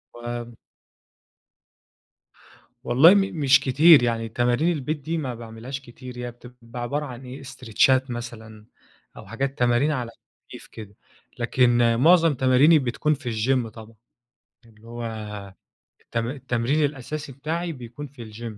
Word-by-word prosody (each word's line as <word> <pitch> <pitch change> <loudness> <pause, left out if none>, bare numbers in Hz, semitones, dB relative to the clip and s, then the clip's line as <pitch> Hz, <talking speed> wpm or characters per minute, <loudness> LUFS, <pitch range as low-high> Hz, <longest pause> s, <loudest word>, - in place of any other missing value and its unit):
و 120 -1 -7 2.3
والله 145 +10 +6
م - - +5 0.2
مش 140 -2 +5
كتير، 140 +2 +6
يعني 115 -1 -1
تمارين 120 +8 +1
البيت 150 0 -2
دي 155 +4 -4
ما 130 -6 -4
باعملهاش 115 +3 -8
كتير 125 0 -11
هي 125 0 -5
بتبقى 120 0 -11
عبارة 145 +5 -2
عن 130 -1 -9
إيه 130 +2 -9
استريتشات 130 0 +1
مثلًا 115 -3 -8 0.5
أو - - -10
حاجات 135 +3 -3
تمارين 120 +5 +2
على 125 -5 -3 0.4
خفيف - - -11
كده، 105 -2 -11 0.4
لكن 120 -1 +3
معظم 165 +1 +5
تماريني 130 +5 +5
بتكون 135 +4 0
في 130 -5 -5
الGym 120 +2 0
طبعًا، 110 0 -13 0.7
اللي 110 0 -19
هو، 120 0 -7 1.0
الت - - -7
التمرين 130 +3 0
الأساسي 145 +1 -5
بتاعي 165 +6 -3
بيكون 125 +1 -9
في 120 -5 -12
الGym 115 -1 -7
125 Hz, 130 wpm, -24 LUFS, 120-140 Hz, 2.3 s, والله